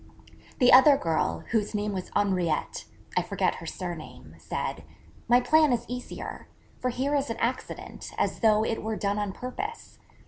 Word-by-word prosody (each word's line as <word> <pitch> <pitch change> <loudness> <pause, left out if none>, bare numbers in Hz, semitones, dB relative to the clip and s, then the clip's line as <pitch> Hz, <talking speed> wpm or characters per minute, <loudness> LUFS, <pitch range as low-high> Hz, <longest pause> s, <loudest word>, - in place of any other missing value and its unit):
The 250 0 +5
other 275 +2 +8
girl, 155 - -1
whose 215 -2 0
name 210 0 -1
was 185 -2 -4
Henriette 185 -6 0 0.3
I - - +4
forget - - 0
her - - -8
surname - - -7
said, - - -4 0.4
'My 245 +1 +6
plan 310 +2 +4
is 240 -1 0
easier: 250 0 -6 0.3
for 255 - 0
here 265 +4 -1
is 280 -1 +1
an 230 - -3
accident, 250 +2 -4
as - - 0
though 215 -1 +4
it 225 - -2
were 220 0 -2
done 205 0 -1
on 205 -2 -1
purpose. 400 - -6
230 Hz, 165 wpm, -27 LUFS, 205-255 Hz, 0.4 s, other